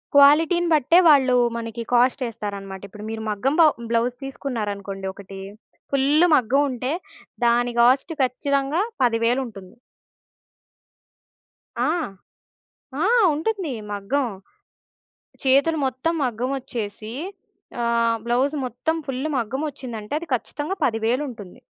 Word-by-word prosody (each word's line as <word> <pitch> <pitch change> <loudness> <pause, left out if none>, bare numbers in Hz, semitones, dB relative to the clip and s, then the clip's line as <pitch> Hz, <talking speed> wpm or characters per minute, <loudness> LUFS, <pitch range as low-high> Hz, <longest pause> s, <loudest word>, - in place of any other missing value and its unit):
క్వాలిటీ‌ని 320 +5 +5
బట్టే 315 +4 +5
వాళ్ళు 270 -5 +5 0.2
మనకి 230 0 -5
కాస్టేస్తారన్నమాట. 215 -6 0
ఇప్పుడు 210 +2 -11
మీరు 225 0 -4
మగ్గం 245 +8 0
బా - - +8 0.2
బ్లౌజ్ 235 +1 +1
తీసుకున్నారనుకోండి 205 -8 -4
ఒకటి, 195 0 -10 0.5
ఫుల్లు 285 +5 +4
మగ్గం 260 +2 +3
ఉంటే, 255 +1 -3 0.5
దాని 240 +1 +2
కాస్ట్ 265 +7 +3
ఖచ్చితంగా 280 +5 0 0.2
పదివేలుంటుంది. 230 -4 0 2.1
ఆ! - - +2 1.2
ఆ! - - +3 0.3
ఉంటుంది. 350 0 -2 0.2
మగ్గం. 225 +8 -1 1.2
చేతులు 275 +5 +3
మొత్తం 260 +6 -1
మగ్గం 250 +1 -1
ఒచ్చేసి. 215 -3 -6 0.7
ఆహ్, 235 -1 +2
బ్లౌజ్ 255 +5 +1
మొత్తం 255 +6 -2
ఫుల్ 270 +2 -2
మగ్గమొచ్చిందంటే, 250 -2 -4
అది 340 - -9
ఖచ్చితంగా 295 +8 -4
పదివేలుంటుంది. 225 -3 -2
250 Hz, 95 wpm, -23 LUFS, 225-280 Hz, 2.1 s, బా